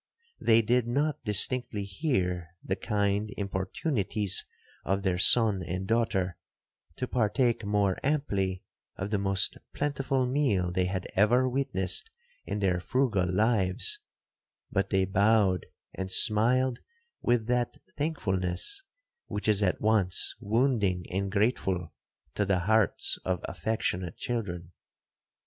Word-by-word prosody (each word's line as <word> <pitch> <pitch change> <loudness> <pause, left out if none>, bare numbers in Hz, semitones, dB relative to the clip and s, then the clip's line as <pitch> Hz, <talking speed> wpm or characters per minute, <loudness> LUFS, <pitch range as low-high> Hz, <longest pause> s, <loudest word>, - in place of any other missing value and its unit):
They 115 0 +4
did 120 +2 +2
not 145 +4 -1
distinctly 105 +1 +1
hear 90 - -2
the 95 - -1
kind 100 +1 -1
importunities 100 - -1 0.4
of 95 +1 -1
their 90 -2 0
son 105 -2 +5
and 90 +2 -4
daughter, 95 -6 0 0.6
to 125 - -3
partake 120 0 +1
more 100 -2 +1
amply 100 -11 -1 0.3
of 100 +2 -5
the 105 - +1
most 95 -1 +1 0.2
plentiful 135 -2 0
meal 125 -10 +1
they 90 +1 +1
had 90 0 -3
ever 120 +6 +3
witnessed 130 - 0 0.4
in - - -2
their 90 -2 +1
frugal 100 -5 0
lives,—but 95 -1 -2
they 95 -1 +2
bowed 100 -1 +2 0.3
and 95 0 -5
smiled 120 +6 +4 0.4
with 120 -2 +1
that 120 0 -1 0.2
thankfulness 115 - -1 0.5
which 105 - -4
is 105 -1 +3
at 95 -3 +1
once 105 -4 +2
wounding 105 -5 +1
and 95 +1 -2
grateful 95 -6 0 0.4
to 105 - 0
the 95 -3 +1
hearts 110 0 +1
of 95 -2 -1
affectionate 95 -6 -2
children. 90 -8 -4
105 Hz, 120 wpm, -28 LUFS, 95-120 Hz, 0.6 s, son